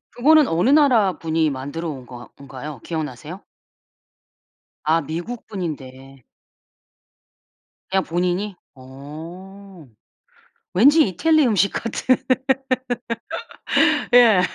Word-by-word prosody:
그거는 300 Hz, +4 st, +5 dB
어느 170 Hz, +10 st, +1 dB
나라 255 Hz, -10 st, +4 dB
분이 160 Hz, -1 st, 0 dB
만들어 145 Hz, +5 st, -5 dB
온 130 Hz, -4 st, -8 dB
건 120 Hz, 0 st, -11 dB
건가요? 140 Hz, 0 st, -9 dB
기억나세요? 155 Hz, +2 st, -6 dB, 1.4 s
아 160 Hz, +2 st, +2 dB
미국 170 Hz, -, -6 dB
분인데 135 Hz, -, -7 dB, 1.7 s
그냥 190 Hz, 0 st, +1 dB
본인이? 180 Hz, +3 st, -2 dB, 0.2 s
어. 165 Hz, +7 st, -12 dB, 0.9 s
왠지 285 Hz, -, +5 dB
이태리 310 Hz, -, +2 dB
음식 200 Hz, -4 st, +2 dB
같은. 240 Hz, +3 st, 0 dB, 2.0 s
예. 225 Hz, -6 st, +7 dB
175 Hz, 180 characters per minute, -21 LUFS, 145-210 Hz, 2.0 s, 예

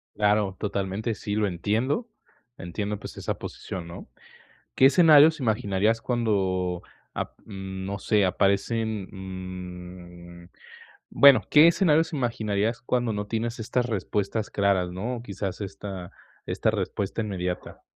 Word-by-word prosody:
Claro, 105 Hz, -2 st, +2 dB
totalmente, 100 Hz, +2 st, -2 dB
sí, 105 Hz, 0 st, -4 dB
lo 105 Hz, -1 st, +2 dB
entiendo. 110 Hz, -, -1 dB, 0.5 s
Entiendo, 100 Hz, +3 st, -4 dB
pues, -, -, -9 dB
esa -, -, -3 dB
posición, 90 Hz, -3 st, -7 dB
¿no? 85 Hz, -, -10 dB, 0.7 s
¿Qué 135 Hz, -, +7 dB
escenarios 155 Hz, -1 st, +6 dB
imaginarías 110 Hz, -1 st, +1 dB
cuando 95 Hz, -7 st, 0 dB, 0.3 s
ap -, -, -5 dB
mm, 95 Hz, -2 st, -6 dB
no 100 Hz, 0 st, -4 dB
sé, 105 Hz, -2 st, +2 dB
aparecen, 100 Hz, +2 st, 0 dB, 1.4 s
mm, 85 Hz, -, -17 dB, 0.6 s
bueno, 140 Hz, -2 st, +7 dB
qué 150 Hz, +2 st, +8 dB
escenarios 165 Hz, -2 st, +3 dB
imaginarías 115 Hz, -4 st, -1 dB
cuando 120 Hz, -3 st, 0 dB
no 105 Hz, 0 st, -3 dB
tienes 115 Hz, +1 st, -3 dB
estas 120 Hz, +2 st, 0 dB
respuestas 105 Hz, 0 st, -2 dB
claras, 95 Hz, -3 st, +1 dB
no? 115 Hz, +6 st, -4 dB
Quizás 100 Hz, -2 st, -5 dB
esta 100 Hz, -2 st, -7 dB, 0.3 s
esta -, -, 0 dB
respuesta 100 Hz, +3 st, -2 dB
inmediata. 90 Hz, -4 st, -4 dB
105 Hz, 120 wpm, -26 LUFS, 95-120 Hz, 1.4 s, qué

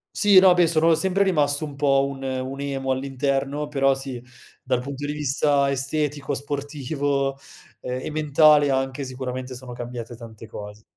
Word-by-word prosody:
Sì, 205 Hz, -2 st, +5 dB
no, 185 Hz, -1 st, +8 dB
beh, 175 Hz, -2 st, +4 dB
sono 165 Hz, 0 st, +3 dB
sempre 190 Hz, +4 st, +2 dB
rimasto 150 Hz, -5 st, +1 dB
un 145 Hz, -2 st, -9 dB
po' 140 Hz, -1 st, +2 dB
un 135 Hz, -1 st, -6 dB
un 130 Hz, +1 st, -4 dB
emo 135 Hz, -1 st, -2 dB
all'interno, 135 Hz, +2 st, -1 dB
però 135 Hz, -2 st, +2 dB
sì, 135 Hz, -3 st, -6 dB, 0.4 s
dal 125 Hz, -, 0 dB
punto 140 Hz, +2 st, -5 dB
di -, -, -2 dB
vista 140 Hz, -1 st, +1 dB
estetico, 140 Hz, +1 st, -2 dB
sportivo, 140 Hz, -1 st, -2 dB, 0.4 s
ehm, 125 Hz, 0 st, -4 dB
e -, -, -4 dB
mentale 150 Hz, -1 st, +4 dB
anche 135 Hz, +1 st, -1 dB
sicuramente, 130 Hz, 0 st, -5 dB
sono 125 Hz, -1 st, -9 dB
cambiate 120 Hz, -1 st, -7 dB
tante 115 Hz, -1 st, -11 dB
cose. 105 Hz, 0 st, -10 dB
140 Hz, 160 wpm, -23 LUFS, 130-150 Hz, 0.4 s, no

